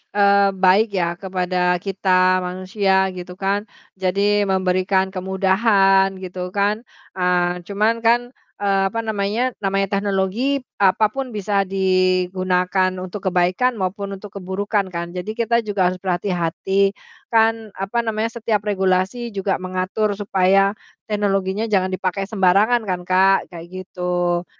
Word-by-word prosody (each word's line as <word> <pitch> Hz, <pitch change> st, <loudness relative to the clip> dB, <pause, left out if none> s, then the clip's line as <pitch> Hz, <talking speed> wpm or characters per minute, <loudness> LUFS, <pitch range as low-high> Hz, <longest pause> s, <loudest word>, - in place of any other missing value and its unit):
eee 200 Hz, -1 st, +4 dB
baik 190 Hz, +4 st, +4 dB
ya 175 Hz, -1 st, -1 dB
kepada 180 Hz, -1 st, 0 dB
kita 185 Hz, 0 st, +2 dB
manusia 190 Hz, +1 st, 0 dB
gitu 180 Hz, 0 st, -8 dB
kan. 200 Hz, +2 st, -1 dB, 0.3 s
Jadi 200 Hz, +2 st, +1 dB
memberikan 190 Hz, 0 st, +1 dB
kemudahan 195 Hz, +1 st, +2 dB
gitu 180 Hz, 0 st, -6 dB
kan. 210 Hz, +3 st, 0 dB, 0.3 s
Eee 180 Hz, 0 st, +1 dB
cuman 215 Hz, +3 st, +1 dB
kan, 240 Hz, +2 st, +2 dB, 0.3 s
eee, 195 Hz, -1 st, +2 dB
apa 230 Hz, +3 st, -3 dB
namanya 220 Hz, +4 st, -1 dB
namanya 195 Hz, 0 st, -1 dB
teknologi 205 Hz, +8 st, -1 dB, 0.2 s
apapun 215 Hz, +5 st, +1 dB
bisa 200 Hz, -1 st, 0 dB
digunakan 185 Hz, 0 st, +1 dB
untuk 185 Hz, +2 st, -6 dB
kebaikan 185 Hz, +7 st, +1 dB
maupun 200 Hz, 0 st, -3 dB
untuk 200 Hz, 0 st, -9 dB
keburukan 195 Hz, +2 st, -1 dB
kan. 170 Hz, -1 st, -5 dB
Jadi 185 Hz, +4 st, -5 dB
kita 235 Hz, 0 st, +1 dB
juga 190 Hz, -3 st, +1 dB
harus 185 Hz, -, -7 dB
berhati-hati, 190 Hz, +2 st, 0 dB, 0.3 s
kan 225 Hz, -2 st, +1 dB
apa 195 Hz, +5 st, -2 dB
namanya 225 Hz, +1 st, -1 dB
setiap 215 Hz, -2 st, 0 dB
regulasi 195 Hz, +3 st, -1 dB
juga 195 Hz, -1 st, -1 dB
mengatur 185 Hz, +3 st, -2 dB
supaya 195 Hz, -1 st, +2 dB, 0.4 s
teknologinya 200 Hz, 0 st, 0 dB
jangan 190 Hz, -3 st, +1 dB
dipakai 185 Hz, +1 st, -2 dB
sembarangan 210 Hz, +3 st, +2 dB
kan, 180 Hz, -1 st, -2 dB
Kak. 190 Hz, +1 st, +4 dB
Kayak 170 Hz, -1 st, -9 dB, 0.2 s
gitu, 175 Hz, -1 st, -1 dB
195 Hz, 125 wpm, -20 LUFS, 185-205 Hz, 0.4 s, eee